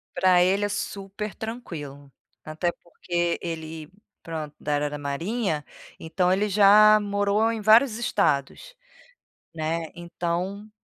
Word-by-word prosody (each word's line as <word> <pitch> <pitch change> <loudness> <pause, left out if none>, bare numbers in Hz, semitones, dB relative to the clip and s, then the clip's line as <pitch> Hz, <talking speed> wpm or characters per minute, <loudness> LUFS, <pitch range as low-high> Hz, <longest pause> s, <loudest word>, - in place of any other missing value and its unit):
Pra 180 -1 +4
ele 195 +3 +2
é - - -2
super 200 +1 -5
tranquilo. 150 - -8 0.3
Até 160 +3 -2
porque 175 0 -2
ele, 160 -2 -6 0.3
pronto, 155 -3 -6
da 150 0 -1
área 145 0 -1
da 150 - -6
marinha, 155 +4 -2 0.4
então 180 +3 0
ele 205 +2 +1
já 210 +2 +7
morou 205 +2 +1
em 225 -1 -4
vários 220 +2 +5
estados, 210 - -1 0.8
né. 160 0 -3
Então, 175 +4 -4
180 Hz, 120 wpm, -25 LUFS, 160-210 Hz, 0.8 s, já